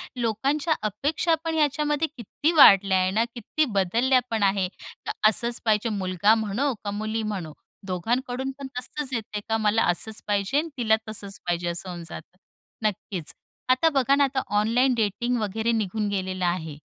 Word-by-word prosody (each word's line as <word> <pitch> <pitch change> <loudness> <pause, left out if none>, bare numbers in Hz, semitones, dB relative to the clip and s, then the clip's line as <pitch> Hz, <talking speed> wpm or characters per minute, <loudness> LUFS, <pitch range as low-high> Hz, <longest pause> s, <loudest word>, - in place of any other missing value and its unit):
लोकांच्या 270 +7 0
अपेक्षा 290 - 0
पण 325 -1 -2
ह्याच्यामध्ये 295 +1 +1
किती 290 - -1
वाढल्या 195 -6 +7
आहेत 185 +1 +1
ना, 225 +2 +3
किती 300 +7 -1
बदलल्या 235 +8 +3
पण 220 -2 0
आहेत. 195 -2 +2 0.4
तर - - 0 0.2
असंच 235 +2 0
पाहिजे. 220 +1 +2
मुलगा 195 +1 +2
म्हणो 225 +6 -1
का 205 - -3
मुली 215 +2 -2
म्हणो, 185 -8 -4 0.3
दोघांकडून 245 +8 -2
पण 275 - -5
तसंच 265 +2 -4
येते 215 -2 -3
का 225 - +2
"मला 215 +1 +2
असंच 215 +5 -4
पाहिजे 205 +6 0
आणि 325 +2 0
तिला 220 -3 +3
तसंच 200 -2 -5
पाहिजे", 175 0 -1
असं 175 +2 -4
होऊन 175 -1 -6
जातं. 175 +3 -10 0.5
नक्कीच. 190 -5 -2 0.4
आता 260 +6 +4
बघा 275 -2 +3
ना, 285 - +3
आता 270 -1 0 0.2
ऑनलाइन 245 +5 +2
डेटिंग 235 +3 0
वगैरे 220 +3 -1
निघून 215 -1 -1
गेलेलं 185 -2 -2
आहे. 160 -4 -2
220 Hz, 165 wpm, -25 LUFS, 195-260 Hz, 0.5 s, वाढल्या